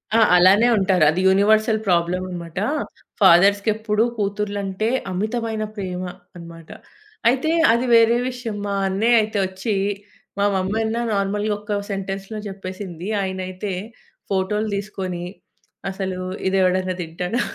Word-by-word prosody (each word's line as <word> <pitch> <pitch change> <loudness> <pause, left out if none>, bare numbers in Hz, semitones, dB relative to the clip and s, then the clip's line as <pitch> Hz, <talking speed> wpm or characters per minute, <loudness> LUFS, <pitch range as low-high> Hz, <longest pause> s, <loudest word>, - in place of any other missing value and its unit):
ఆ! - - +6 0.2
అలానే 190 +6 +6
ఉంటారు. 190 -4 +3
అది 180 +4 -1
యూనివర్సల్ 215 +3 +3
ప్రాబ్లమన్నమాట. 175 -1 -1 0.6
ఫాదర్స్‌కెప్పుడు 205 +4 +4
కూతురలంటే, 205 0 -2 0.2
అమితమైన 220 +3 -2
ప్రేమ 185 -3 -4 0.3
అన్నమాట. 170 -1 -11 0.6
అయితే 265 +6 +1 0.2
అది 235 +2 +1
వేరే 230 +1 +5
విషయం, 245 -4 -5
మా 200 - -1
అన్నయ్య 225 +5 +3
అయితే 215 0 -3
ఒచ్చి 190 +4 -3 0.7
మా 200 - +3
మమ్మీ 190 +3 -1
అన్న 220 +1 -2 0.2
నార్మల్‌గా 205 +1 0
ఒక 205 0 -3
సెంటెన్స్‌లో 195 +2 -5
జెప్పేసింది. 185 -2 -7
ఆయన 190 -1 -3
అయితే 185 +2 -5 0.6
ఫోటో‌లు 200 +3 0
దీసుకొని, 190 -3 -4 0.7
అసలు 190 -1 -4 0.3
"ఇది 190 +1 +1
ఎవడన్నా 185 0 +1
తింటాడా?" 180 +7 -3
195 Hz, 115 wpm, -21 LUFS, 185-215 Hz, 0.7 s, ఆ